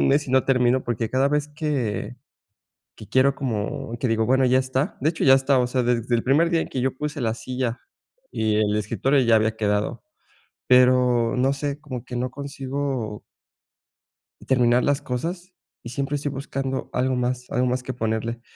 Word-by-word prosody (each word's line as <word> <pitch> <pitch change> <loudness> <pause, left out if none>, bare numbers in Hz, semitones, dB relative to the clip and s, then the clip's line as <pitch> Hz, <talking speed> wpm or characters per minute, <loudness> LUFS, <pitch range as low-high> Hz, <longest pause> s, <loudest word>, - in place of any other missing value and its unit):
un - - +3
mes 145 +1 +2
y - - -3
no 130 0 +3
termino 125 -1 +2
porque, 115 -1 -2
cada 135 +2 +2
vez 150 0 0
que 145 -8 -3 0.8
que - - -12
quiero 135 +1 +3
como 115 -2 -3
que 125 - -1
digo: 115 -1 +1
"Bueno, 130 +1 +3
ya 130 0 +4
está", 130 +2 -1
de 150 +4 +2
hecho, 165 - -3
ya 135 - +8
está, 135 0 +3
o 125 - +2
sea, 125 +1 0
desde 120 0 0
el 115 - +1
primer 150 +6 +3
día 165 -2 +2
en - - -4
que 130 - -3
yo 130 +1 0
puse 150 +1 -4
la 115 -2 0
silla 125 +1 -3 0.5
y 110 -1 0
el 105 -1 +1
escritor 115 +6 +1
ya 115 -1 +5
había 110 0 +1
quedado, 105 -1 -1 0.6
pero, 125 -2 +4
no 130 +2 +2
sé 140 +1 -4
como 130 -6 -7
que 125 - -6
no 125 +1 -2
consigo 135 -5 -4 1.3
terminar 125 -1 +3
las 145 0 +1
cosas 175 +9 -5 0.3
y - - -8
siempre 140 +3 -2
estoy 145 0 -3
buscando 135 -1 -4
algo 130 +1 0
más 125 0 -2
algo 125 +1 +1
más 125 0 -1
que 130 +1 -5
ponerle. 115 0 -2
130 Hz, 190 wpm, -23 LUFS, 120-140 Hz, 1.3 s, ya